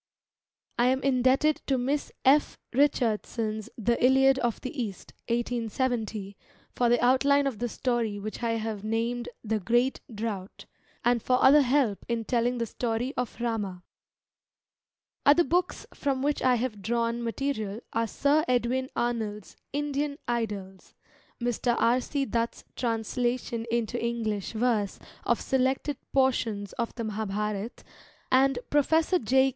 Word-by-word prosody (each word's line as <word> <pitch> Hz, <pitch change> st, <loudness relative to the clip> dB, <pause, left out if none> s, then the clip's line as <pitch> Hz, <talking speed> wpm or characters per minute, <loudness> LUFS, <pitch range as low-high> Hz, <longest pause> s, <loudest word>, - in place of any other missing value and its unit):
I 240 Hz, -, +5 dB
am 260 Hz, +1 st, +1 dB
indebted 265 Hz, +3 st, +3 dB
to 270 Hz, -, +2 dB
Miss 275 Hz, +4 st, -1 dB
F. 285 Hz, +3 st, +4 dB, 0.2 s
Richardson's 225 Hz, -5 st, 0 dB
The 235 Hz, +2 st, 0 dB
Iliad 265 Hz, +1 st, +5 dB
of 240 Hz, -3 st, -1 dB
the 255 Hz, -, -6 dB
East 200 Hz, -5 st, -6 dB
(1870) 230 Hz, -3 st, -2 dB, 0.4 s
for 240 Hz, -1 st, +2 dB
the 240 Hz, 0 st, +4 dB
outline 280 Hz, +3 st, +4 dB
of 260 Hz, -7 st, -2 dB
the 240 Hz, -, -1 dB
story 235 Hz, -4 st, -1 dB
which 215 Hz, +3 st, -6 dB
I 230 Hz, -1 st, 0 dB
have 220 Hz, -2 st, -3 dB
named 230 Hz, +2 st, -1 dB
The 220 Hz, -1 st, 0 dB
Great 240 Hz, +6 st, +1 dB
Drought, 210 Hz, -3 st, -5 dB, 0.4 s
and 240 Hz, -1 st, +3 dB
for 250 Hz, +3 st, +2 dB
other 290 Hz, +3 st, +8 dB
help 255 Hz, -6 st, +1 dB
in 230 Hz, -1 st, -1 dB
telling 245 Hz, +1 st, +1 dB
the 230 Hz, -, -1 dB
story 235 Hz, +3 st, -2 dB
of 250 Hz, -1 st, -3 dB
Rama. 210 Hz, -6 st, -2 dB, 1.4 s
Other 295 Hz, +5 st, +6 dB
books 355 Hz, +5 st, 0 dB
from 270 Hz, -2 st, -1 dB
which 290 Hz, +1 st, 0 dB
I 255 Hz, -1 st, +4 dB
have 230 Hz, -4 st, -3 dB
drawn 235 Hz, +3 st, 0 dB
material 230 Hz, -3 st, -2 dB
are 230 Hz, 0 st, +1 dB
Sir 285 Hz, +7 st, +2 dB
Edwin 255 Hz, +1 st, +1 dB
Arnold's 220 Hz, -4 st, -2 dB, 0.2 s
Indian 290 Hz, 0 st, -2 dB
Idylls, 205 Hz, -5 st, -4 dB, 0.4 s
Mr. 240 Hz, 0 st, 0 dB
R. 245 Hz, +2 st, +3 dB
C. 280 Hz, +1 st, -2 dB
Dutt's 230 Hz, 0 st, -2 dB
translation 235 Hz, 0 st, -1 dB
into 235 Hz, 0 st, -1 dB
English 225 Hz, -4 st, -2 dB
verse 220 Hz, -3 st, 0 dB, 0.3 s
of 235 Hz, -, +2 dB
selected 265 Hz, +2 st, 0 dB
portions 230 Hz, -7 st, +1 dB
of 235 Hz, -2 st, -2 dB
the 235 Hz, -, -4 dB
Mahabharata, 210 Hz, 0 st, -3 dB, 0.5 s
and 265 Hz, 0 st, +4 dB
Professor 320 Hz, +5 st, +3 dB
J. 265 Hz, +4 st, +3 dB
240 Hz, 135 wpm, -28 LUFS, 220-260 Hz, 1.4 s, other